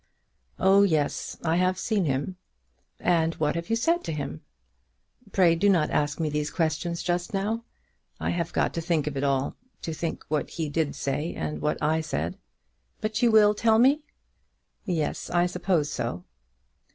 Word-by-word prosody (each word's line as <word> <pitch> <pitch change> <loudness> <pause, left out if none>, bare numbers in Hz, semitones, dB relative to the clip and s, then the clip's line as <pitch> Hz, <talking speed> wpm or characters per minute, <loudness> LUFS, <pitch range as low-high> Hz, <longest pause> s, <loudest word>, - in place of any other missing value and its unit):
"Oh 195 +1 +5
yes; 160 -7 0
I 165 0 +2
have 185 +1 +2
seen 205 -4 0
him." 140 +6 -1 0.6
"And 165 -2 +2
what 150 -1 0
have 170 +3 -4
you 225 - +3
said 335 +9 +1
to - - -2
him?" 140 - -4 0.9
"Pray 180 -3 +5
do 190 +5 +3
not 170 -6 +3
ask 150 +1 0
me 160 - 0
these 150 0 -1
questions 165 +1 -1
just 175 +2 -1
now. 220 +4 -1 0.5
I - - -1
have 170 -1 -2
got - - 0
to 165 - -2
think 165 -3 0
of 150 -2 -3
it 135 - -2
all; 140 -1 0 0.3
to 165 - -3
think 165 +1 -4
what 150 -2 -1
he 160 -3 -3
did 155 -1 -1
say 145 +4 -2
and 75 -1 -4
what 150 - 0
I 160 +2 +2
said." 170 +5 -3 0.6
"But 215 +1 -2
you 240 - +5
will 215 -2 +6
tell 220 +1 +3
me." 270 +6 +5 0.8
"Yes; 165 -6 -2
I 175 0 +3
suppose 180 -4 0
so." 115 -7 -3
170 Hz, 175 wpm, -26 LUFS, 150-195 Hz, 0.9 s, will